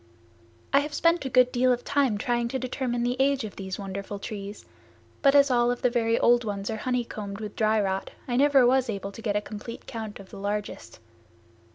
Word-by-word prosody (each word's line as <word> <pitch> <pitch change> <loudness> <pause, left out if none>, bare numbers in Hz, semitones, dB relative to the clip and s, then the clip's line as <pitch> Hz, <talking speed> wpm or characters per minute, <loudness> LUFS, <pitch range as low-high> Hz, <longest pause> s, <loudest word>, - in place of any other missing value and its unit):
I 275 - +7
have 295 +1 -4
spent 335 -3 +2
a - - -1
good 250 0 +4
deal 255 0 +3
of 245 0 0
time 270 -7 +1
trying 240 +2 0
to 265 - -2
determine 255 -1 -2
the 245 +1 0
age 275 -1 +2
of 215 - -7
these 190 -2 -5
wonderful 200 0 -5
trees, 200 0 -7 0.6
but 275 -1 +5
as 280 -1 +6
all 240 -1 +3
of 245 +2 -2
the 250 - +3
very 230 -1 +1
old 240 0 +4
ones 200 -1 -3
are 220 - -3
honey 250 +2 -1
combed 200 -2 -6
with 210 -2 -7
dry 220 0 +2
rot 195 -1 -1 0.2
I 245 - -1
never 275 -1 +5
was 255 0 +3
able 200 -2 -4
to 225 - -10
get 210 -2 -1
a 210 - +1
complete 215 +2 -8
count 220 -4 -6
of 195 -1 -13
the - - -9
largest. 205 +1 -4
235 Hz, 220 wpm, -26 LUFS, 205-255 Hz, 0.6 s, I